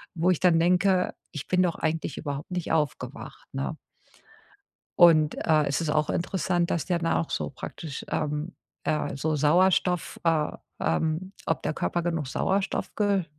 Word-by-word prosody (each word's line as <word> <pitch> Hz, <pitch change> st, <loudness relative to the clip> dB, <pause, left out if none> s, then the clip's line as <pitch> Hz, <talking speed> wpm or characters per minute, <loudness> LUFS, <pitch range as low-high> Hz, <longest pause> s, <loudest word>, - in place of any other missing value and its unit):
wo 175 Hz, +2 st, +3 dB
ich 180 Hz, -, 0 dB
dann 175 Hz, -3 st, +4 dB
denke: 180 Hz, +2 st, +3 dB, 0.2 s
„Ich 150 Hz, -, -6 dB
bin 185 Hz, 0 st, +3 dB
doch 175 Hz, -2 st, 0 dB
eigentlich 160 Hz, -1 st, -2 dB
überhaupt 145 Hz, +3 st, -5 dB
nicht 180 Hz, -2 st, -3 dB
aufgewacht.“, 150 Hz, -4 st, -3 dB
ne? 135 Hz, +4 st, -3 dB, 1.2 s
Und, 160 Hz, -3 st, +6 dB
äh, 155 Hz, -2 st, +4 dB
es 140 Hz, -, 0 dB
ist 160 Hz, -2 st, -1 dB
auch 150 Hz, 0 st, +1 dB
interessant, 175 Hz, -1 st, 0 dB
dass 165 Hz, -4 st, 0 dB
der 175 Hz, -2 st, +1 dB
dann 165 Hz, -, +1 dB
auch 165 Hz, -, -1 dB
so -, -, -2 dB
praktisch, 140 Hz, +1 st, -7 dB
ähm, 150 Hz, +4 st, -2 dB, 0.3 s
äh, 150 Hz, -2 st, -1 dB
so 155 Hz, +3 st, 0 dB
Sauerstoff, 180 Hz, +3 st, +2 dB
äh, 160 Hz, -3 st, +2 dB, 0.3 s
ähm 160 Hz, -, 0 dB
ob 165 Hz, -, 0 dB
der -, -, -1 dB
Körper 175 Hz, +2 st, -1 dB
genug 165 Hz, -4 st, -1 dB
Sauerstoff 195 Hz, +7 st, -1 dB
ge 200 Hz, -3 st, +2 dB
165 Hz, 160 wpm, -27 LUFS, 150-180 Hz, 1.2 s, Und